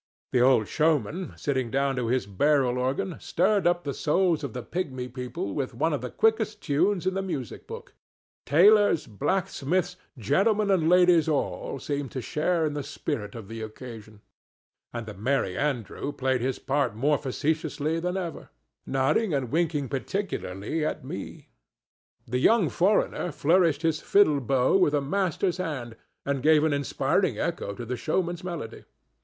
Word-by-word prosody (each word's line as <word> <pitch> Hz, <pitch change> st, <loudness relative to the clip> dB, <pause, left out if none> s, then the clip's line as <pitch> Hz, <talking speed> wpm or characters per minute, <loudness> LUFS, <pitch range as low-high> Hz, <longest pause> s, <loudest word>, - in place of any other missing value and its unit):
The 125 Hz, -, +3 dB
old 125 Hz, -4 st, +4 dB
showman, 160 Hz, -, 0 dB
sitting 130 Hz, -4 st, -1 dB
down 135 Hz, +2 st, 0 dB
to 125 Hz, -2 st, -1 dB
his 125 Hz, -2 st, +1 dB
barrel 125 Hz, +5 st, +2 dB
organ, 135 Hz, +7 st, -1 dB
stirred 200 Hz, +2 st, +1 dB
up 175 Hz, 0 st, +1 dB
the 140 Hz, -, -3 dB
souls 165 Hz, +1 st, +1 dB
of 135 Hz, -6 st, -4 dB
the 125 Hz, -, -5 dB
pigmy 130 Hz, -8 st, -4 dB
people 125 Hz, -5 st, -5 dB
with 130 Hz, -3 st, -3 dB
one 160 Hz, +6 st, +1 dB
of 145 Hz, -, -2 dB
the 125 Hz, -, -4 dB
quickest 220 Hz, -, +1 dB
tunes 180 Hz, +6 st, +1 dB
in 185 Hz, -, +1 dB
the 195 Hz, -, -1 dB
music 145 Hz, -, -5 dB
book; -, -, -9 dB, 0.5 s
tailors, 205 Hz, +3 st, +5 dB
blacksmiths, 180 Hz, -, -1 dB, 0.2 s
gentlemen 200 Hz, -, +2 dB
and 165 Hz, -4 st, +3 dB
ladies 180 Hz, -2 st, +5 dB
all 145 Hz, -2 st, -2 dB
seemed 140 Hz, 0 st, -3 dB
to 130 Hz, -, -3 dB
share 165 Hz, +2 st, 0 dB
in 150 Hz, -, -1 dB
the 145 Hz, -, -3 dB
spirit 135 Hz, -6 st, -4 dB
of 110 Hz, -4 st, -8 dB
the 115 Hz, +1 st, -7 dB
occasion, 110 Hz, -1 st, -9 dB, 0.7 s
and 120 Hz, -1 st, -5 dB
the 110 Hz, -, -7 dB
Merry 110 Hz, -2 st, -1 dB
Andrew 140 Hz, 0 st, -2 dB
played 130 Hz, -3 st, 0 dB
his 130 Hz, +1 st, -1 dB
part 135 Hz, -5 st, -1 dB
more 145 Hz, +5 st, +2 dB
facetiously 155 Hz, +3 st, -1 dB
than 180 Hz, +2 st, -2 dB
ever, 175 Hz, -3 st, -5 dB, 0.4 s
nodding 135 Hz, +8 st, +1 dB
and 130 Hz, -4 st, -2 dB
winking 155 Hz, -3 st, 0 dB
particularly 150 Hz, -, -3 dB
at -, -, -3 dB
me. -, -, -7 dB, 0.8 s
The 125 Hz, +1 st, -1 dB
young 200 Hz, -, +4 dB
foreigner 180 Hz, -1 st, +1 dB
flourished 160 Hz, +1 st, +2 dB
his 160 Hz, -1 st, +1 dB
fiddle 155 Hz, -8 st, +4 dB
bow 130 Hz, -, +2 dB
with 150 Hz, -6 st, +3 dB
a -, -, +3 dB
master's 180 Hz, +4 st, 0 dB
hand, 140 Hz, -10 st, -4 dB, 0.3 s
and 140 Hz, -1 st, -1 dB
gave 155 Hz, +1 st, +5 dB
an 160 Hz, -2 st, +2 dB
inspiring 140 Hz, -1 st, 0 dB
echo 100 Hz, -, -3 dB
to 120 Hz, -, -6 dB
the 125 Hz, +2 st, -3 dB
showman's 175 Hz, +4 st, -1 dB
melody. 170 Hz, -11 st, -6 dB
145 Hz, 160 wpm, -26 LUFS, 125-175 Hz, 0.8 s, tailors